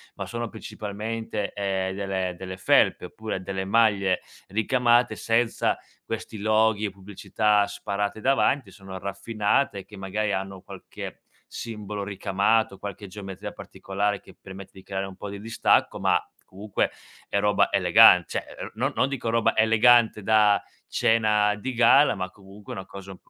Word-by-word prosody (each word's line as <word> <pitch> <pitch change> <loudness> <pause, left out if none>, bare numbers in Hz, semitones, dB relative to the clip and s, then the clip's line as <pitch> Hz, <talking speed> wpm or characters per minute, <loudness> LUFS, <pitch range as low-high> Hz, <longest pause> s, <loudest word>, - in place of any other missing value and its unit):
ma - - -5
sono 120 0 -4
principalmente, 110 0 -5
ehm, 95 -2 -2
delle 95 -2 -2
delle 95 0 -7
felpe, - - +3
oppure 110 -3 -5
delle 95 0 -4
maglie 100 -3 +2 0.3
ricamate 120 +3 +2
senza 115 +1 +1 0.3
questi 110 -1 -5
loghi 110 0 +2
e 105 - -1
pubblicità 100 +2 0
sparate 100 +1 -3
davanti, 135 +1 +1
sono 95 -2 -10
raffinate 105 +4 -1
e - - -10
che 105 - -13
magari 105 +2 -2
hanno 95 -1 -4
qualche - - -10 0.2
simbolo 105 -3 -6
ricamato, 100 +1 0
qualche 100 0 -7
geometria 95 -1 -8
particolare 100 +1 -3
che - - -16
permette 95 0 -11
di 95 - -14
creare 95 0 -4
un 95 -1 -10
po' 100 - -7
di 100 0 -7
distacco, 115 +1 +1
ma - - +3 0.3
comunque 100 +2 -2 0.4
è - - -1
roba 105 0 +2
elegan 95 -1 +7
cioè, - - -3
ehm, - - -7
no - - -1
non 135 - +2
dico 130 -4 -3
roba 115 -1 +2
elegante 110 0 +5
da 105 -1 +4 0.2
cena 105 -2 +2
di 130 +5 -5
gala 135 +2 +5
ma 95 -1 -4
comunque 100 +1 -12
è - - -7
una 95 - -6
cosa 95 -1 -10
105 Hz, 150 wpm, -25 LUFS, 95-110 Hz, 0.4 s, elegan